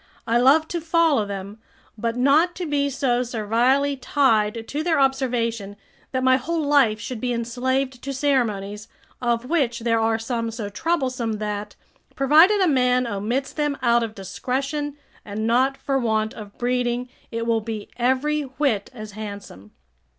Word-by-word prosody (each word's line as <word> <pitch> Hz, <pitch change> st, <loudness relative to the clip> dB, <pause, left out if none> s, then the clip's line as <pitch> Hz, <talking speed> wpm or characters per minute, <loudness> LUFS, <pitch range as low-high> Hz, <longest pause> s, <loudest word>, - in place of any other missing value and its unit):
I 230 Hz, +1 st, +2 dB
love 290 Hz, +6 st, +5 dB
to 340 Hz, -, -3 dB
follow 325 Hz, -9 st, +2 dB
them, 200 Hz, +2 st, -6 dB, 0.4 s
but 230 Hz, +2 st, -2 dB
not 300 Hz, +7 st, +3 dB
to 360 Hz, -, -4 dB
be 285 Hz, -2 st, 0 dB
so 260 Hz, -2 st, 0 dB
servilely 245 Hz, +5 st, +1 dB
tied 225 Hz, -5 st, +1 dB
to 295 Hz, -, -3 dB
their 330 Hz, -2 st, +2 dB
observation 235 Hz, -6 st, 0 dB, 0.4 s
that 260 Hz, -1 st, -1 dB
my 260 Hz, 0 st, +5 dB
whole 320 Hz, +5 st, -2 dB
life 270 Hz, -7 st, +3 dB
should 240 Hz, +1 st, -6 dB
be 250 Hz, -1 st, -1 dB
enslaved 255 Hz, +2 st, -1 dB
to 275 Hz, -, -4 dB
ceremonies, 220 Hz, -7 st, -1 dB, 0.3 s
of 240 Hz, -1 st, 0 dB
which 255 Hz, -6 st, 0 dB
there 230 Hz, -1 st, +2 dB
are 225 Hz, 0 st, +2 dB
some 230 Hz, 0 st, -2 dB
so 225 Hz, -2 st, -5 dB
troublesome 255 Hz, -3 st, -1 dB
that, 210 Hz, -1 st, -4 dB, 0.4 s
provided 320 Hz, +9 st, +5 dB
a 370 Hz, -, +4 dB
man 250 Hz, -3 st, +3 dB
omits 235 Hz, +5 st, -2 dB
them 295 Hz, -2 st, -1 dB
out 235 Hz, -1 st, +4 dB
of 225 Hz, -1 st, -4 dB
discretion, 275 Hz, -, -3 dB, 0.3 s
and 210 Hz, +1 st, -4 dB
not 260 Hz, +4 st, +2 dB
for 270 Hz, -1 st, -1 dB
want 220 Hz, -2 st, 0 dB
of 205 Hz, -2 st, -11 dB
breeding, 245 Hz, 0 st, 0 dB, 0.2 s
it 230 Hz, 0 st, -3 dB
will 230 Hz, -1 st, +1 dB
be 215 Hz, -1 st, -5 dB
every 265 Hz, +5 st, +1 dB
whit 260 Hz, -6 st, -1 dB
as 215 Hz, -2 st, -8 dB
handsome. 200 Hz, -, -9 dB
245 Hz, 160 wpm, -23 LUFS, 225-275 Hz, 0.4 s, love